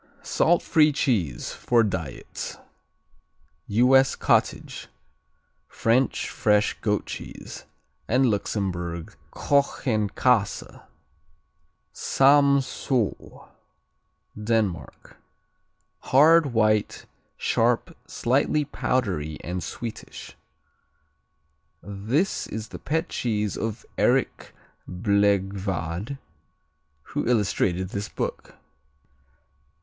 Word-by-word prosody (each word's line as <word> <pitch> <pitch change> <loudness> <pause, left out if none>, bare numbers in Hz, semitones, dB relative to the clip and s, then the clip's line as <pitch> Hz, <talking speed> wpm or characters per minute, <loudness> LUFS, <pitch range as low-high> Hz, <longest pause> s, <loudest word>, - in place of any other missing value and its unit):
Salt 175 +2 +2
free 155 -2 +4
cheese, 105 - -1
for 120 -2 +2
diets 85 - -5 1.1
U.S. 130 +5 +4
cottage; - - 0 0.8
French 120 +4 +1
fresh 105 -1 +2
goat 105 -2 0
cheese; - - -8 0.4
and 130 +3 +3
Luxembourg 90 -6 -2 0.2
Kochenkäse. 125 -5 0 1.1
Samsö 135 -4 +1 0.9
Denmark 105 -4 -2 0.8
Hard; 155 +4 +5
white; 110 -2 +1 0.3
sharp; - - 0
slightly 140 +4 +1
powdery 90 - -2
and 90 +1 -4
sweetish. 110 +7 -8 1.5
This 110 - -1
is 110 +1 -6
the - - -9
pet 160 +3 -1
cheese 105 -4 -1
of 110 -1 -4
Erik - - +1 0.3
Blegvad 95 - 0 0.9
who - - -4
illustrated 95 -5 +1
this 100 +1 -4
book. - - -5
110 Hz, 70 wpm, -25 LUFS, 95-130 Hz, 1.5 s, Hard